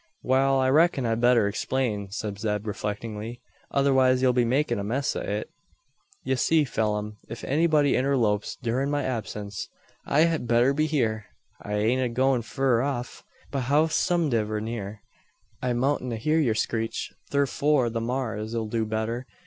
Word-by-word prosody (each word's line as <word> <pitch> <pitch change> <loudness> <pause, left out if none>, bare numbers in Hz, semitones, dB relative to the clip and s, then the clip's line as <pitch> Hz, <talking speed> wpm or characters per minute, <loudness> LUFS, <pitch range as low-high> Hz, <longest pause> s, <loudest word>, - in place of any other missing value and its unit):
"Wal, 135 +1 +3
I 130 - +2
reck'n 145 -1 +3
I'd 115 0 0
better 120 -3 +4
explain," 105 -1 -2
said 100 0 -5
Zeb, 105 -1 -2
reflectingly; 105 +2 -5 0.3
"otherwise 130 -2 +3
ye'll 130 -1 +3
be 125 0 +3
makin' 130 0 +1
a - - -3
mess 130 +7 -1
o' - - -2
it." - - -3 0.7
"Ye - - 0
see, 160 +4 +3
Pheelum, 105 -3 -2
ef 115 - -7
anybody 150 -1 +3
interlopes 120 -6 +1
durin' 130 +4 0
my 145 -1 0
absince 105 -5 -4 0.4
I 150 - +3
hed 160 -6 +1
better 120 +3 +4
be 155 +2 +1
hyur. 115 -8 0 0.4
I 105 - -5
ain't 115 +5 +1
a 125 - 0
goin' 130 +1 +2
fur 125 0 +1
off. 130 -2 -4 0.3
But 135 -3 -2
howsomediver 145 -6 +1
near, 105 -2 -5 0.6
I 125 -1 0
moutn't 130 +1 0
hear 155 +8 +1
yur 120 -8 +2
screech; 115 0 -2 0.2
thurfore 140 -2 +2
the 115 0 -2
maar's 115 -2 -3
'll 115 -1 -1
do 110 0 -1
better. 110 +3 -3
120 Hz, 155 wpm, -26 LUFS, 110-135 Hz, 0.7 s, better